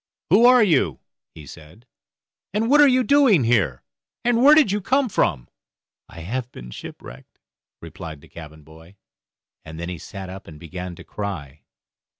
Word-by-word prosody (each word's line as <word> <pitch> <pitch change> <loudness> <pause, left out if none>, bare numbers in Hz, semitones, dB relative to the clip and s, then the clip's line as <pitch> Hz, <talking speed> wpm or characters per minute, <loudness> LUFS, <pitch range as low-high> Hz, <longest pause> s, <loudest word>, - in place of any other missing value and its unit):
"Who 225 +6 +6
are 250 -2 +6
you?" 135 - +1 0.4
he 75 - -12
said, 80 - -15 0.7
"and 225 +4 0
what 295 +1 +6
are 290 - +7
you 255 -1 +3
doing 265 - +4
here, 100 - 0 0.4
and 240 -1 +2
where 295 +2 +8
did 305 -10 +4
you 205 +1 -1
come 260 +6 +1
from?" 70 - -1 0.6
"I 85 - -11
have 120 +8 -5
been - - -11
shipwrecked," - - -12 0.5
replied 80 -3 -9
the - - -17
cabin 80 -2 -12
boy; 80 +5 -17 0.7
and 80 +1 -10
then 85 +1 -5
he 90 -2 -6
sat 95 +1 -9
up 95 +1 -10
and 75 -2 -12
began 90 +2 -8
to - - -13
cry. 80 -9 -7
95 Hz, 165 wpm, -22 LUFS, -, 0.7 s, where